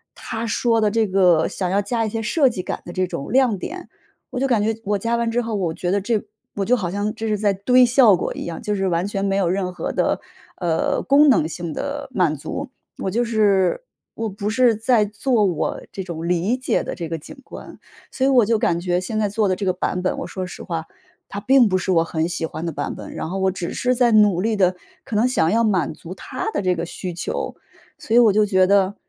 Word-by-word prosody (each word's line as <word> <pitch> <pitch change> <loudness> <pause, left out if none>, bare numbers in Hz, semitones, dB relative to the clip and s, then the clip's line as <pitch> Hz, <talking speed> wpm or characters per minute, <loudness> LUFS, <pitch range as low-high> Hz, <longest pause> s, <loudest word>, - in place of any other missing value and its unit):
他 225 0 -5
说 225 0 +1
的 210 - +3
这 225 0 +2
个 180 -4 +3
想 185 -2 -3
要 200 +2 +2
加 225 +2 -1
一 - - -2
些 225 +1 -3
设 270 +4 +3
计 190 -6 -4
感 - - -4
的 175 - -7
这 185 0 0
种 140 - -6
亮 250 -6 +3
点 355 - -7 0.4
我 250 - -4
就 - - +2
感 235 -5 +2
觉 225 +1 0
我 205 0 +1
加 230 +3 0
完 235 -1 0
之 245 +1 +1
后， 230 -1 -4
我 175 -5 -1
觉 175 +1 -2
得 200 0 +1
这 215 +1 0 0.3
我 195 -1 -1
就 250 - +3
好 185 -8 -2
像 205 +2 -2
这 225 0 -4
是 210 -1 0
在 205 -1 +1
堆 250 +6 +4
效 240 -5 +5
果 - - -3
一 - - -5
样， 170 -1 -6
就 210 - -2
是 195 -1 0
完 175 +1 0
全 195 -1 -3
没 195 0 0
有 180 -3 +1
任 185 -1 -1
何 170 - -4
的， - - +1 0.4
呃， 170 -3 0
功 285 +2 +5
能 180 - +4
性 165 -1 -5
的 285 -1 -4
满 175 -9 +1
足， 265 - -6 0.3
我 190 - -2
就 240 +2 +1
是 210 - +2 0.3
我 225 0 -3
不 205 +1 -4
是 235 0 +3
在 220 0 +2
做 215 +1 +1
我 175 -4 -1
这 195 - -4
种 170 -2 -5
理 180 +8 +1
解 255 - 0
的 - - -5
这 170 -2 -5
个 165 - -3
景 150 - -11
观。 - - -11 0.3
所 265 - 0
以 275 - +4
我 245 -5 +5
就 225 0 +1
感 170 0 +1
觉 180 0 0
现 215 +4 -4
在 210 -2 +1
做 210 0 +1
的 185 - +1
这 200 - -4
个 185 - +3
版 180 0 -2
本， 185 - -1
我 - - -5
说 185 -1 -5
实 180 - -9
话 165 -2 -4 0.4
它 200 - -5
并 255 0 +4
不 185 - +2
是 185 +1 -2
我 165 - +4
很 165 0 -1
喜 170 -2 -2
欢 160 +1 -6
的 165 - -2
版 145 - -3
本， - - -9
然 - - -4
后 190 - -3
我 190 0 +2
只 180 -2 -5
是 250 0 0
在 240 -1 +3
努 205 -4 +4
力 220 +1 0
地， 185 -2 +3 0.3
可 220 - -5
能 220 - +3
想 245 -10 +2
要 230 +2 +3
满 185 -9 +1
足 170 +3 -9
他 380 - -5
的 - - -1
这 185 -1 +1
个 170 0 -3
需 180 +1 -6
求。 175 - -4 0.4
所 225 - -5
以 - - +8
我 225 -4 +5
就 210 +1 +4
觉 185 -2 +3
得 200 0 +3
200 Hz, 275 characters per minute, -21 LUFS, 180-230 Hz, 0.4 s, 以